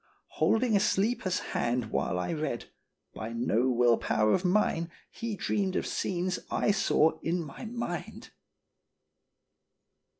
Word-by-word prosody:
Holding 225 -1 +3
a - - +5
sleeper's 195 -2 +1 0.2
hand 120 -2 0
while 90 - 0
I 90 - -2
read, 155 -7 -3 0.4
by 110 +1 -6
no 120 +1 +1
will 120 -1 +4
power 110 0 +2
of 185 - +1
mine 180 -3 +2 0.2
he 230 -2 -4
dreamed 190 -1 -1
of - - 0
scenes 185 0 -1
I - - +2
saw 160 -5 +2
in 170 +2 -1
my 150 - -9
mind." 235 +1 -5
175 Hz, 130 wpm, -29 LUFS, 120-205 Hz, 0.4 s, a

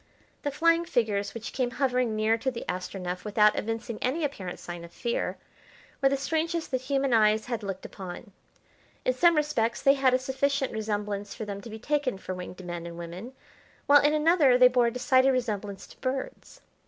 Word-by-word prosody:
The 290 - -1
flying 335 +4 +3
figures 215 -10 -1
which 230 -1 -6
came 255 -2 0
hovering 250 -4 +1
near 215 +1 +2
to 230 +4 -1
the 240 -2 -6
Astronef, 180 0 -4
without 210 0 +4
evincing 225 0 -3
any 280 +6 0
apparent 195 -11 -4
sign 175 -1 -7
of 170 - -11
fear, 235 +4 -2 0.6
were 270 - +5
the 275 - +1
strangest 325 +3 -1
that 255 -1 0
human 270 -1 0
eyes 215 -1 +4
had 235 -3 -3
looked 195 -2 -5
upon. 190 +3 -8 0.7
In 255 - +3
some 340 +6 +4
respects 290 -7 0
they 275 - +5
had 265 -2 +3
a - - +4
sufficient 270 +1 -1
resemblance 205 -2 -3
for 220 - -5
them 200 -1 -6
to 230 - -10
be 220 - -7
taken 280 -1 -1
for 185 - -6
winged 180 0 -8
men 175 -1 -5
and 170 0 -8
women, 175 +9 -8 0.5
while 290 0 +7
in 295 +1 +3
another 305 -5 +5
they 250 0 +8
bore 245 -1 +3
a - - 0
decided 260 +2 +3
resemblance 210 -6 -3
to - - -17
birds. 260 0 -4
240 Hz, 190 wpm, -28 LUFS, 205-270 Hz, 0.7 s, they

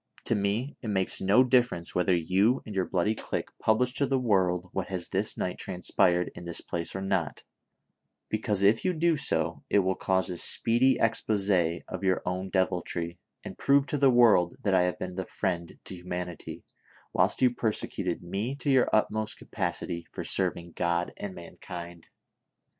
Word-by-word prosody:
" - - -24
To - - +3
me 105 +7 -1
it 115 - -6
makes 95 -3 +1
no 100 +7 +5
difference 125 -9 +2
whether 90 0 +2
you 95 +9 +2
and 110 - -7
your 95 -2 0
bloody 95 +4 +1
clique - - -4
publish 125 +3 +2
to 140 0 +1
the 135 - +1
world 95 -7 +1
what 95 - -2
has 90 -2 -3
this 100 +3 0
night 90 - -3
transpired 90 0 +1
in - - -10
this 85 -1 -3
place 85 +1 -4
or 95 - -3
not; 95 -5 -1 0.8
because, 105 -2 -1
if 105 +3 +4
you 185 - +1
do 170 0 +2
so, 140 - -1
it - - +3
will 95 -1 +2
cause 95 0 0
a 90 - -5
speedy 120 +8 +3
expose 105 -3 +1 0.4
of 95 +1 -6
your 95 -1 +1
own 95 +1 -3
deviltry, 90 -2 -1 0.2
and - - -9
prove 140 0 +4
to 145 - -2
the 135 -1 +5
world 115 -8 +5
that 100 - +1
I 95 - +5
have - - -6
been 90 0 -5
the 95 +1 -3
friend 85 -4 -3
to 95 - -5
humanity, 90 -1 -6 0.5
whilst - - +2
you 125 -1 +4
persecuted 110 -6 -2
me 100 +9 -3
to 140 0 -1
your 130 -2 +4
utmost 110 0 0
capacity 85 -1 -4
for - - -5
serv 95 -2 0
ing 85 0 -10
God 85 0 -1
and 100 -2 -6
mankind 85 -1 -9
95 Hz, 180 wpm, -28 LUFS, 90-115 Hz, 0.8 s, no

